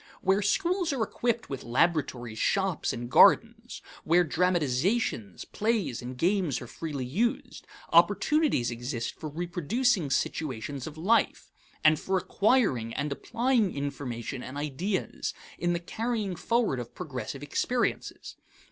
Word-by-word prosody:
Where 190 +2 +3
schools 350 - +1
are 250 -5 0
equipped 235 +1 -1
with 135 - -6
laboratories, 125 -4 0
shops, 195 -3 +1
and 120 0 -5
gardens, 125 - +4 0.2
where 175 +2 +4
dramatizations, 165 - 0
plays, 205 - -1
and 125 +1 -7
games 175 - +1
are - - -8
freely 140 +1 -5
used, 210 - -2 0.3
opportunities 300 - +3
exist 120 0 -4
for 155 - -7
reproducing 175 - 0
situations 135 -2 -2
of 155 0 -9
life, 215 +8 +1 0.3
and 155 -1 +5
for 190 0 0
acquiring 185 - +1
and 145 +1 -2
applying 230 - 0
information 135 -3 -4
and 130 +2 -7
ideas 155 +7 -3 0.2
in 175 0 +1
the 170 - -1
carrying 215 +1 -2
forward 230 - 0
of 120 -1 -8
progressive 140 -4 -6
experiences. 240 - -2
165 Hz, 125 wpm, -28 LUFS, 130-210 Hz, 0.3 s, and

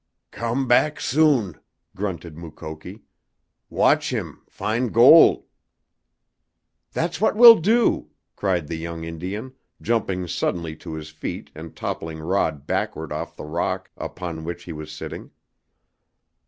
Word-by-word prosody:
"Come 120 +3 -2
back 150 +5 +3
soon!" 130 - +2 0.4
grunted 90 -5 -5
Mukoki. 80 +4 -9 0.7
"Watch - - +3
heem. - - -4
Fin' 115 +4 -1
gol'!" 125 +9 +7 1.5
"That's 170 +3 -2
what 220 - +3
we'll 230 0 +10
do!" 225 +8 +2 0.3
cried 90 -5 0
the 80 - -4
young 85 0 -6
Indian, 95 +10 -6 0.3
jumping 95 -6 -1
suddenly 85 0 -2
to 80 -1 -8
his 80 0 -8
feet 80 - -6
and 80 +1 -10
toppling 80 -1 -5
Rod 80 -3 -1
backward - - -3
off - - -5
the - - -8
rock 80 +3 -3
upon 85 -3 -6
which 85 +1 -6
he 85 - -7
was 75 0 -8
sitting. 75 - -8
90 Hz, 125 wpm, -23 LUFS, 80-120 Hz, 1.5 s, we'll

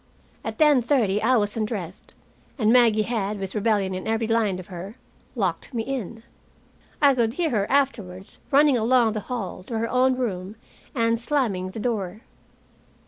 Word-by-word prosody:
At - - -5
ten 300 -5 +5
thirty 225 -6 +1
I 255 +3 +3
was 205 -1 0
undressed, 210 -6 -5 0.4
and 220 -3 +3
Maggie 230 -4 +5
had, 210 -3 -2
with 195 -1 -5
rebellion 205 -3 +1
in 185 +2 -5
every 225 +1 0
line 220 -4 +1
of 185 - -8
her, 190 +4 -8 0.4
locked 195 +3 -2
me 225 - -1
in. 230 -4 -5 0.8
I 285 -2 +5
could 235 -3 0
hear 335 -4 0
her, 205 -3 0
afterwards 215 -10 -1
running 290 -1 +5
along 235 -1 +3
the 215 - -2
hall 230 -7 -4
to 230 - -4
her 230 +1 -1
own 255 +2 +2
room 200 -5 -3 0.4
and 230 -1 +1
slamming 230 -8 -1
the 205 - -7
door. 210 -3 -3
225 Hz, 165 wpm, -24 LUFS, 200-250 Hz, 0.8 s, ten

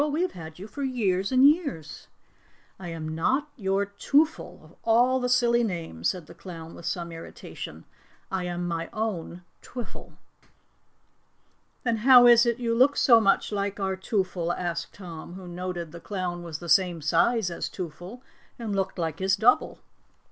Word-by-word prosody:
"We 300 +3 +1
have 370 - -1
had 160 -2 -10
you 190 - -8
for 250 +7 -8
years 205 -8 0
and 260 +1 +7
years." 285 - -1 0.7
"I 185 - -7
am 160 -2 -5
not 265 - 0
your 195 -4 0
Twoffle 285 +10 0
of - - -17
all 245 +3 +4
the 250 0 -1
silly 240 -1 +3
names," 165 - -2
said 180 -4 -4
the - - -13
clown 165 -3 -10
with 170 - -8
some 170 0 -3
irritation. 165 0 -9 0.5
"I 185 -1 -2
am 175 0 -3
my 165 -1 -3
own 190 -5 -4 0.2
Twiffle." 245 -2 -9 1.7
"Then 235 -2 +1
how 245 +2 +8
is 240 0 +7
it 235 -1 +1
you 235 -2 -1
look 260 +4 +4
so 230 -3 +6
much 195 0 +2
like 200 0 -2
our 190 -1 -1
Twoffle?" 185 -3 -1
asked 175 -2 -3
Tom, 175 -3 -9
who 185 -1 -9
noted 175 -2 -5
the 170 - -9
clown 180 -2 -4
was 165 -3 -6
the 170 - -9
same 175 -3 +3
size 180 +6 +2
as 170 - -4
Twoffle 180 +6 -8 0.4
and 220 -4 -3
looked 195 0 -2
like 165 -2 -3
his 190 +1 +2
double. 225 +5 +2
190 Hz, 170 wpm, -26 LUFS, 170-235 Hz, 1.7 s, how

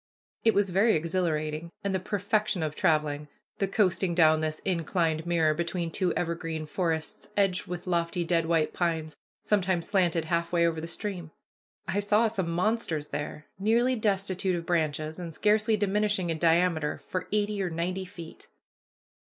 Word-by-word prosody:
It 225 - +4
was 200 -2 +2
very 205 +5 +4
exhilarating, 160 -1 -1
and 200 -1 -1
the 190 - +1
perfection 205 -1 0
of 155 -1 -2
traveling, 150 -2 +1 0.3
the 195 - +1
coasting 190 -3 +1
down 155 -2 +5
this 155 -1 -2
inclined 165 -2 0
mirror 165 -3 +3
between 170 +1 -2
two 185 -1 0
evergreen 165 -2 -2
forests 165 -3 -2
edged 195 -3 +2
with 180 0 -5
lofty 170 0 0
dead 165 -1 +1
white 165 -2 +1
pines, 160 -3 -1 0.3
sometimes 190 -4 +1
slanted 175 -5 +2
half 170 +1 -1
way 170 -1 +3
over 165 -1 0
the 165 - -5
stream. 175 -2 -4 0.6
I 190 +2 0
saw 210 +3 +3
some 195 -6 -2
monsters 175 -4 -1
there, 145 +1 -5
nearly 235 +5 +3
destitute 195 -4 0
of 170 -1 -4
branches, 155 -1 -1
and 170 -3 -6
scarcely 215 +1 +3
diminishing 205 -3 +1
in 160 - -3
diameter 165 -2 +2
for 185 - -3
eighty 210 -1 0
or 185 - -1
ninety 180 +3 -2
feet. 175 -4 -11
175 Hz, 160 wpm, -28 LUFS, 160-195 Hz, 0.6 s, down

